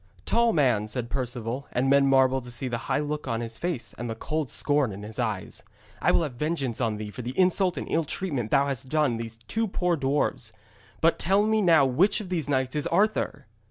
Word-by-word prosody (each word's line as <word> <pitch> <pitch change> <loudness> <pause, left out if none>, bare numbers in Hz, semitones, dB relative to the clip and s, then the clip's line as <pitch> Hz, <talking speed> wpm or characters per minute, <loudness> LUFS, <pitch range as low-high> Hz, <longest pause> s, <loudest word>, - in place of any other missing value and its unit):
'Tall 235 0 +3
man,' 125 - +2
said 120 +2 -5
Perceval, 125 0 -3
and 125 +2 0
men 140 0 +5
marvelled 135 -1 +3
to - - -8
see 120 +2 -4
the 120 -1 -2
high 135 - +2
look 150 0 -3
on 115 - -1
his 115 -1 -6
face 130 - -3
and 120 0 -4
the 115 - -3
cold 150 +4 -3
scorn 145 -5 +1
in 100 +1 -8
his 110 +3 -8
eyes, 110 -6 -3 0.4
'I - - +4
will - - +3
have 145 -5 -4
vengeance 135 -3 -2
on 110 -3 0
thee 105 0 -6
for 125 - -7
the 125 +2 -6
insult 185 0 +3
and - - -3
ill 165 - +1
treatment 140 - -3
thou 140 - +4
hast 135 -1 -4
done 150 -6 +1
these 115 0 -6
two 220 - -2
poor 180 -3 0
dwarfs. 135 -5 -1 0.5
But 165 +1 +3
tell 195 +4 +3
me 220 0 +2
now 165 -7 +5
which 170 +11 +2
of 205 -4 -7
these 165 -6 -2
knights 130 0 0
is 150 - 0
Arthur?' 200 -6 +1
135 Hz, 225 wpm, -26 LUFS, 120-165 Hz, 0.5 s, men